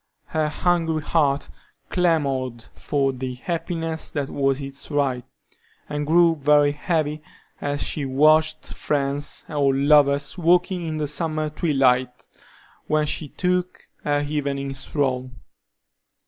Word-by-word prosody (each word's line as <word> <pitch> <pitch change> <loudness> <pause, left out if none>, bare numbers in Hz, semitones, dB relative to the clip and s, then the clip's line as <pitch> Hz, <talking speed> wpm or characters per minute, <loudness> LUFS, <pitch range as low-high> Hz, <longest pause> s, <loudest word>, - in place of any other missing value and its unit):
Her 155 -1 0
hungry 165 -1 0
heart 145 -3 +1 0.4
clamored 135 -9 0
for 135 -2 -1
the 130 0 -5
happiness 165 +2 -3
that 145 -3 -3
was 135 -1 +1
its 140 0 -6
right, 140 -4 0 0.6
and 150 0 -3
grew 165 +1 +5
very 145 0 +4
heavy 150 0 -1 0.4
as 145 0 -1
she 145 - -2
watched 155 +3 +3
friends 140 0 -2
or 140 -3 +1
lovers 145 +3 +3
walking 175 +1 +2
in 155 -1 -3
the 155 - -1
summer 155 0 -2
twilight 130 -5 +1 0.6
when 155 0 +2
she 150 +1 -2
took 180 +3 -2
her 145 0 0
evening 140 -2 -2
stroll. 130 -2 -2
145 Hz, 120 wpm, -23 LUFS, 140-160 Hz, 0.6 s, grew